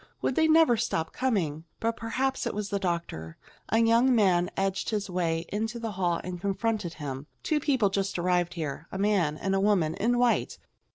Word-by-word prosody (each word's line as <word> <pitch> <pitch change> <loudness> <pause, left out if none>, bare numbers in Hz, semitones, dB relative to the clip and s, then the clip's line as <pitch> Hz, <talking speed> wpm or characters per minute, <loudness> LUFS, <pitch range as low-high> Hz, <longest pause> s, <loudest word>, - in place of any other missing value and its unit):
Would - - +1
they 320 +4 +3
never 315 -7 +5
stop 160 -7 -1
coming! 170 - -1
But 230 0 0
perhaps 260 +4 -1
it - - -3
was 210 -1 -3
the 200 - -1
doctor. 170 - -3 0.3
A 225 - +2
young 230 +3 +4
man 180 -5 +3
edged 195 0 -1
his 205 -3 -2
way 165 -2 -1
into 220 +3 -2
the 230 -2 -4
hall 180 -3 0
and 180 -1 -6
confronted 200 -2 -1
him. 140 -2 -6 0.2
"Two 310 - +1
people 260 -9 +2
just 195 -1 -1
arrived 175 0 +1
here. 155 -1 -4
A - - -4
man 190 -7 +1
and 195 +3 -1
a 195 - +2
woman 195 -6 +2
in 240 +7 +1
white. 245 -1 +1
195 Hz, 190 wpm, -28 LUFS, 170-230 Hz, 0.3 s, never